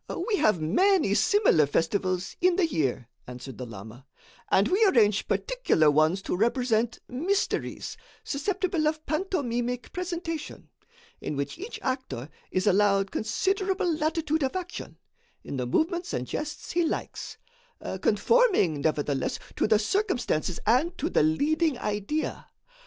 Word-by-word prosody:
"We 410 Hz, -, +3 dB
have 210 Hz, -, +3 dB
many 300 Hz, -, +3 dB
similar 295 Hz, -, +4 dB
festivals 185 Hz, +4 st, -1 dB
in 360 Hz, 0 st, +4 dB
the 375 Hz, -2 st, +3 dB
year," 135 Hz, -, -1 dB, 0.2 s
answered 125 Hz, +1 st, -9 dB
the 125 Hz, -, -5 dB
lama, 110 Hz, +5 st, -11 dB, 0.4 s
"and 195 Hz, -, +4 dB
we 395 Hz, +5 st, +3 dB
arrange 220 Hz, -, +4 dB
particular -, -, +2 dB
ones 155 Hz, +6 st, +2 dB
to -, -, -2 dB
represent 235 Hz, +2 st, +1 dB
'mysteries,' 350 Hz, +11 st, -2 dB, 0.3 s
susceptible 340 Hz, +1 st, -1 dB
of 310 Hz, 0 st, -2 dB
pantomimic 250 Hz, -8 st, -2 dB
presentation, 340 Hz, -3 st, -5 dB, 0.5 s
in 150 Hz, -, -4 dB
which 140 Hz, -, -4 dB
each 415 Hz, +6 st, -6 dB
actor 255 Hz, -, -3 dB, 0.2 s
is 185 Hz, -, 0 dB
allowed 200 Hz, -1 st, +3 dB
considerable 380 Hz, -, 0 dB
latitude 315 Hz, 0 st, 0 dB
of 265 Hz, +3 st, -1 dB
action, 360 Hz, -1 st, -6 dB, 0.5 s
in 140 Hz, -, -5 dB
the 125 Hz, -1 st, -2 dB
movements 345 Hz, -, 0 dB
and 125 Hz, -, -2 dB
jests 300 Hz, -, -5 dB
he 345 Hz, 0 st, +2 dB
likes, 320 Hz, -, -4 dB, 0.6 s
conforming, 390 Hz, -, +3 dB
nevertheless, 145 Hz, -3 st, 0 dB, 0.2 s
to -, -, +1 dB
the 215 Hz, -, +5 dB
circumstances 225 Hz, -, 0 dB
and 270 Hz, -, +2 dB
to 315 Hz, -, -2 dB
the -, -, +3 dB
leading 295 Hz, -, +2 dB
idea. 210 Hz, +8 st, -3 dB
250 Hz, 130 wpm, -27 LUFS, -, 0.6 s, the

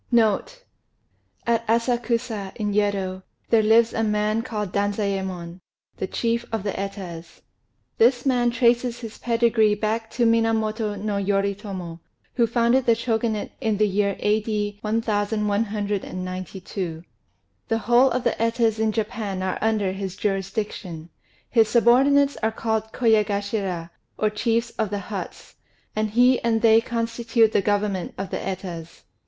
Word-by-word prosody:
NOTE 240 Hz, -, +1 dB, 0.8 s
At 230 Hz, -1 st, +1 dB
Asakusa, 230 Hz, -3 st, 0 dB
in 210 Hz, -2 st, -2 dB
Yedo, 195 Hz, -2 st, 0 dB, 0.3 s
there 225 Hz, -2 st, +6 dB
lives 225 Hz, +2 st, +4 dB
a 225 Hz, -, 0 dB
man 210 Hz, +1 st, +1 dB
called 210 Hz, -4 st, -4 dB
Danzayémon, 195 Hz, -4 st, -2 dB, 0.4 s
the 190 Hz, -, -3 dB
chief 235 Hz, +3 st, -1 dB
of 220 Hz, -3 st, -2 dB
the 205 Hz, -, -1 dB
Etas. 190 Hz, -4 st, -7 dB, 0.6 s
This 245 Hz, +2 st, +4 dB
man 245 Hz, -3 st, +3 dB
traces 240 Hz, 0 st, +2 dB
his 225 Hz, -2 st, -8 dB
pedigree 230 Hz, -3 st, +3 dB
back 220 Hz, +2 st, -2 dB
to 240 Hz, -, +2 dB
Minamoto 225 Hz, -2 st, +1 dB
no 205 Hz, 0 st, -2 dB
Yoritomo, 195 Hz, -3 st, -2 dB, 0.3 s
who 235 Hz, -2 st, +2 dB
founded 235 Hz, +3 st, +2 dB
the 230 Hz, -, +5 dB
Shogunate 225 Hz, -2 st, -1 dB
in 220 Hz, -4 st, 0 dB
the 210 Hz, +1 st, +3 dB
year 200 Hz, 0 st, 0 dB
A.D. 210 Hz, -1 st, -1 dB
1192. 205 Hz, -5 st, -2 dB, 0.6 s
The 225 Hz, -, +1 dB
whole 240 Hz, +4 st, +4 dB
of 250 Hz, 0 st, -1 dB
the -, -, +1 dB
Etas 230 Hz, -1 st, +1 dB
in 220 Hz, -1 st, +2 dB
Japan 215 Hz, -3 st, -3 dB
are 185 Hz, -, -2 dB
under 215 Hz, -3 st, +1 dB
his 190 Hz, -1 st, -5 dB
jurisdiction; 195 Hz, -4 st, -3 dB, 0.4 s
his 225 Hz, -3 st, +3 dB
subordinates 275 Hz, +4 st, +4 dB
are 220 Hz, 0 st, 0 dB
called 220 Hz, 0 st, -2 dB
Koyagashira, 200 Hz, -6 st, 0 dB, 0.3 s
or 215 Hz, -1 st, +1 dB
"chiefs 230 Hz, +2 st, 0 dB
of 220 Hz, -2 st, +1 dB
the 205 Hz, -, -2 dB
huts"; 200 Hz, -, -7 dB, 0.4 s
and 215 Hz, 0 st, 0 dB
he 245 Hz, +4 st, +4 dB
and 230 Hz, -1 st, 0 dB
they 225 Hz, 0 st, +6 dB
constitute 230 Hz, -1 st, +1 dB
the 205 Hz, -, +2 dB
government 205 Hz, -2 st, -1 dB
of 195 Hz, -1 st, -5 dB
the -, -, -1 dB
Etas. 180 Hz, -4 st, -6 dB
215 Hz, 135 wpm, -24 LUFS, 200-230 Hz, 0.8 s, there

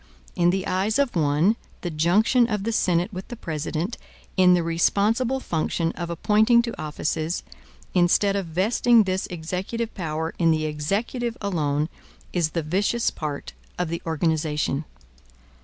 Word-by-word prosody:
In 175 Hz, -2 st, +3 dB
the 190 Hz, +1 st, 0 dB
eyes 195 Hz, +4 st, 0 dB
of 280 Hz, -6 st, +1 dB
one 160 Hz, +7 st, +3 dB, 0.2 s
the 175 Hz, -, -3 dB
junction 205 Hz, +10 st, +3 dB
of 210 Hz, -3 st, -1 dB
the 230 Hz, -, -1 dB
Senate 180 Hz, -1 st, +1 dB
with 185 Hz, +1 st, -6 dB
the 240 Hz, -, -7 dB
President 165 Hz, +1 st, -3 dB, 0.4 s
in 180 Hz, -1 st, +6 dB
the 175 Hz, -, +1 dB
responsible 210 Hz, +10 st, +1 dB
function 165 Hz, -4 st, -1 dB
of 170 Hz, -1 st, -5 dB
appointing 215 Hz, +7 st, +4 dB
to 235 Hz, -, -5 dB
offices, 155 Hz, +2 st, -2 dB, 0.5 s
instead 185 Hz, +3 st, +3 dB
of 195 Hz, -3 st, -2 dB
vesting 220 Hz, +7 st, +3 dB
this 190 Hz, -1 st, -1 dB
executive 185 Hz, +7 st, -4 dB
power 160 Hz, -3 st, -3 dB
in 165 Hz, -2 st, +4 dB
the 155 Hz, -1 st, +2 dB
Executive 205 Hz, -, -2 dB
alone, 155 Hz, -7 st, 0 dB, 0.5 s
is 170 Hz, -3 st, +1 dB
the 165 Hz, +1 st, -2 dB
vicious 200 Hz, +9 st, +1 dB
part 150 Hz, -2 st, -5 dB, 0.2 s
of 180 Hz, -2 st, -1 dB
the 170 Hz, 0 st, -3 dB
organization. 155 Hz, -2 st, 0 dB
180 Hz, 145 wpm, -24 LUFS, 160-210 Hz, 0.5 s, in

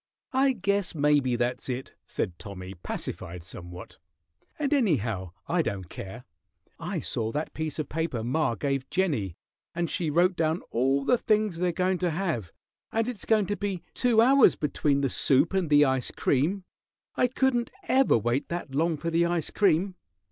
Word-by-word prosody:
"I 265 Hz, +1 st, +3 dB
guess 200 Hz, -4 st, 0 dB
maybe 145 Hz, -4 st, +3 dB
that's 120 Hz, +2 st, -2 dB
it," 130 Hz, +1 st, -4 dB
said 85 Hz, -, -3 dB
Tommy, 95 Hz, -2 st, -8 dB
pacified 85 Hz, -1 st, -6 dB
somewhat. 90 Hz, -1 st, -9 dB, 0.6 s
"And 295 Hz, -1 st, 0 dB
anyhow, 120 Hz, -, +1 dB, 0.2 s
I 175 Hz, 0 st, +1 dB
don't 95 Hz, -, -4 dB
care. 110 Hz, +6 st, -8 dB, 0.6 s
I -, -, -3 dB
saw 110 Hz, 0 st, -2 dB
that 155 Hz, +2 st, -3 dB
piece 155 Hz, -2 st, -3 dB
of 155 Hz, -3 st, -2 dB
paper 155 Hz, -8 st, -2 dB
ma 125 Hz, 0 st, 0 dB
gave 135 Hz, +1 st, -2 dB
Jennie, 140 Hz, -, 0 dB, 0.4 s
and 170 Hz, -1 st, -1 dB
she 165 Hz, -3 st, 0 dB
wrote 175 Hz, +5 st, +3 dB
down 160 Hz, +1 st, 0 dB
all 135 Hz, +4 st, +1 dB
the 245 Hz, -, +3 dB
things 215 Hz, -4 st, +1 dB
they're 180 Hz, +1 st, +1 dB
goin' 185 Hz, +1 st, 0 dB
to 180 Hz, -, +1 dB
have, 155 Hz, -, -2 dB, 0.4 s
and 225 Hz, +1 st, 0 dB
it's 240 Hz, -6 st, -4 dB
goin' 215 Hz, -2 st, +3 dB
to 205 Hz, -, -2 dB
be 200 Hz, -4 st, -3 dB
two 235 Hz, -3 st, +4 dB
hours 265 Hz, +2 st, +6 dB
between 145 Hz, -1 st, 0 dB
the 135 Hz, -, +1 dB
soup 145 Hz, +6 st, +3 dB
and 190 Hz, -5 st, 0 dB
the 145 Hz, 0 st, +6 dB
ice 130 Hz, -2 st, 0 dB
cream. 165 Hz, +9 st, 0 dB, 0.5 s
I 250 Hz, -, +3 dB
couldn't 245 Hz, -1 st, +1 dB
ever 270 Hz, -, +4 dB
wait 120 Hz, +5 st, -1 dB
that 170 Hz, -5 st, -4 dB
long 160 Hz, +3 st, +1 dB
for 165 Hz, +3 st, -3 dB
the 170 Hz, +1 st, +3 dB
ice 170 Hz, -2 st, -1 dB
cream. 190 Hz, -1 st, +2 dB
160 Hz, 170 wpm, -27 LUFS, 125-195 Hz, 0.6 s, hours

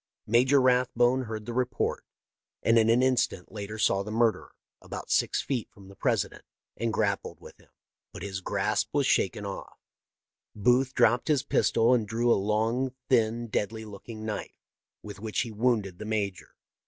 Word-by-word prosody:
" -, -, -65 dB
Major 125 Hz, +5 st, +4 dB
Rathbone 125 Hz, 0 st, +3 dB
heard 110 Hz, -1 st, -6 dB
the 120 Hz, -, -5 dB
report, 130 Hz, +1 st, -1 dB, 0.6 s
and 115 Hz, 0 st, +5 dB
an 110 Hz, 0 st, +3 dB
in 125 Hz, +2 st, +4 dB
stant 90 Hz, -6 st, -1 dB
later 105 Hz, 0 st, -6 dB
saw 100 Hz, -2 st, +2 dB
the 100 Hz, -, -6 dB
murderer, 115 Hz, 0 st, +1 dB, 0.3 s
about -, -, -7 dB
six -, -, +2 dB
feet 130 Hz, -5 st, -3 dB
from 95 Hz, -1 st, -16 dB
the 100 Hz, -, -14 dB
President, -, -, -1 dB, 0.3 s
and 115 Hz, -1 st, -1 dB
grappled 100 Hz, -2 st, -1 dB
with -, -, -14 dB
him, -, -, -23 dB, 0.4 s
but -, -, -9 dB
his 95 Hz, -2 st, -4 dB
grasp 100 Hz, +2 st, 0 dB
was 145 Hz, -1 st, +2 dB
shaken 100 Hz, -3 st, +1 dB
off. 100 Hz, -1 st, -7 dB, 0.8 s
Booth 125 Hz, +5 st, +2 dB
dropped 120 Hz, 0 st, +3 dB
his 150 Hz, -5 st, +2 dB
pistol 115 Hz, +2 st, +3 dB
and 115 Hz, -4 st, +1 dB
drew 120 Hz, +3 st, +1 dB
a -, -, +8 dB
long, 110 Hz, +6 st, 0 dB
thin, 120 Hz, -2 st, +2 dB
deadly 110 Hz, 0 st, -3 dB
looking 110 Hz, +1 st, -9 dB
knife, 110 Hz, -1 st, -6 dB, 0.4 s
with 105 Hz, -1 st, -9 dB
which 110 Hz, 0 st, -2 dB
he 120 Hz, -, -4 dB
wounded 105 Hz, -5 st, 0 dB
the 110 Hz, -, -6 dB
major. 105 Hz, -4 st, -3 dB
115 Hz, 170 wpm, -28 LUFS, 105-125 Hz, 0.8 s, a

